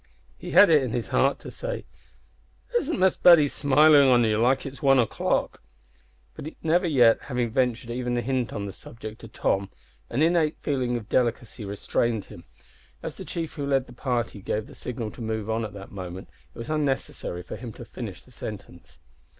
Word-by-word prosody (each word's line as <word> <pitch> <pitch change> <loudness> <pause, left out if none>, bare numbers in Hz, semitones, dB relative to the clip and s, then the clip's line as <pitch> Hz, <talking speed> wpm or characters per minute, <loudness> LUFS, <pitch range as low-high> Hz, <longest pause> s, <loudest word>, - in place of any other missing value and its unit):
He - - -9
had 200 -4 +7
it 150 -3 +6
in 125 -4 -3
his 120 -2 -2
heart 135 +1 +2
to - - -8
say, - - -5 0.9
"Isn't 330 - +1
Miss 190 0 +3
Betty 170 -5 +7
smilin' 145 +1 +5
on 120 -2 +5
ye 110 -1 +2
like 125 +4 +2
one 135 -2 +4
o'clock?" 120 -4 0 0.7
but, 155 - -7
never 175 +3 +2
yet 125 -7 +5
having 125 -3 -2
ventured 125 -1 0
even 120 0 -2
a - - +1
hint 130 -1 -1
on 100 - -4
that 100 - -6
subject 110 -1 -10
to 115 - -9
Tom, 100 -2 -1 0.4
an 135 +6 +1
innate 165 -2 +2
feeling 125 -4 -1
of 110 -3 -8
delicacy 120 -2 -1
restrained 105 +2 -1
him. 85 - -13 0.6
As - - -6
the - - -8
chief 165 -2 -4
who 145 - -4
led 135 -2 +2
the 120 - -14
party 120 -5 -2
gave 105 +2 -2
the - - -14
signal 115 -3 -5
to - - -11
move 110 -1 -3
on 115 +1 0
at 105 - -6
that 100 -1 -10
moment 95 -1 -7 0.2
it - - -18
was 115 +5 -5
unnecessary 135 - -2
for - - -7
him 120 -3 -7
to - - -10
finish - - -8
the - - -20
sentence. - - -9
125 Hz, 190 wpm, -26 LUFS, 110-140 Hz, 0.9 s, had